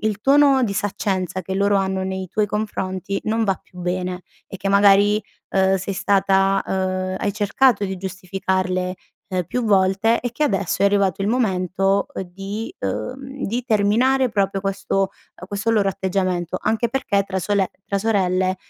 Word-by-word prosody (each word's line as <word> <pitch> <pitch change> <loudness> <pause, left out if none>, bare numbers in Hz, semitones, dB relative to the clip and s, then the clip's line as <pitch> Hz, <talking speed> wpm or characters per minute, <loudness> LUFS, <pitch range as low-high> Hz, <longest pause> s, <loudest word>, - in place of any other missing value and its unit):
il 215 -1 -1
tono 275 0 +5
di 200 -4 0
saccenza 190 -3 -2
che 190 +1 -5
loro 200 +1 +2
hanno 190 -1 0
nei 190 0 -4
tuoi 210 +4 0
confronti 195 -2 -3
non 225 +1 +1
va 195 - +2
più 180 - -18
bene 180 0 -3 0.2
e 195 - -9
che 195 - -2
magari, 200 +1 +5 0.3
uhm, 190 0 +3
sei 195 +1 -4
stata 195 0 +2
uhm, 185 0 -1
hai 205 - -1
cercato 210 +2 +2
di 190 0 -4
giustificarle, 185 0 -2 0.3
ehm, 185 -2 -1
più 250 -1 -2
volte 200 +2 +3
e 245 -1 -3
che 305 - -3
adesso 195 - 0
è - - +6
arrivato 200 -2 +1
il 200 - 0
momento, 195 -4 +1
uhm, - - -4
di, 195 - -6
uhm, 265 +2 -4
di 235 +4 -2
terminare 245 +4 +3
proprio 195 -1 0
questo 195 0 -2
uhm, 195 -1 -6
questo 205 +3 -2
loro 210 -3 +3
atteggiamento, 185 -2 -1
anche 225 +2 0
perché 215 -5 0
tra 190 -1 -3
sole 195 0 0 0.2
tra 200 - 0
sorelle, 185 -3 +1
195 Hz, 165 wpm, -21 LUFS, 190-215 Hz, 0.3 s, è